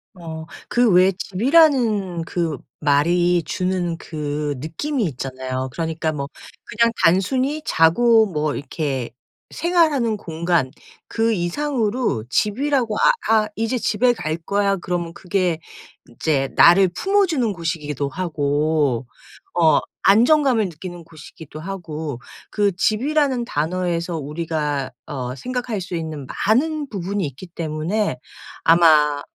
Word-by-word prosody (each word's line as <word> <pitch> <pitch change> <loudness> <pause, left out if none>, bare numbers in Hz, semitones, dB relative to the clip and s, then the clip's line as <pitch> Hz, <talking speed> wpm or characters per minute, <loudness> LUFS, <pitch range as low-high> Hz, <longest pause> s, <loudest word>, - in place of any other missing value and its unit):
어 160 -2 -8 0.2
그 245 -1 +3
왜 185 +2 +5
집이라는 220 - +2
그 165 -4 -2 0.2
말이 170 +4 +2
주는 180 -2 -2
그 150 -2 -4
느낌이 215 - -3
있잖아요. 130 -2 -4
그러니까 160 0 -2
뭐 140 -2 -4 0.4
그냥 230 +2 +2
단순히 255 - +2
자고 220 +8 +4
뭐 155 -6 -2
이렇게 140 -3 -3 0.4
생활하는 310 -10 +2
공간 165 -6 -1 0.4
그 225 0 0
이상으로 220 - -1
집이라고 240 - 0
아 - - +5 0.2
아 220 -1 +4
"이제 225 +3 -1
집에 240 +2 +2
갈 155 -9 -3
거야." 200 +4 0
그러면 175 -1 -3
그게 180 -2 -1 0.5
인제 135 +2 -1
나를 185 +2 +7
품어주는 330 - +1
곳이기도 150 -5 -3
하고 145 -5 0 0.5
어 165 -2 +4 0.2
안정감을 240 +2 +4
느끼는 175 0 -8
곳이기도 155 -1 -12
하고 160 -7 -5 0.3
그 205 -2 +1
집이라는 260 +5 +1
단어에서 170 0 -2
우리가 150 -2 -3
어 130 -4 -5
생각할 245 - -3
수 180 -1 -5
있는 155 -4 -5 0.2
많은 290 +6 +1
부분이 195 -1 -3
있기 140 +7 -10
때문에 165 +1 -2 0.5
아마 155 -3 +5
175 Hz, 255 characters per minute, -21 LUFS, 155-220 Hz, 0.5 s, 나를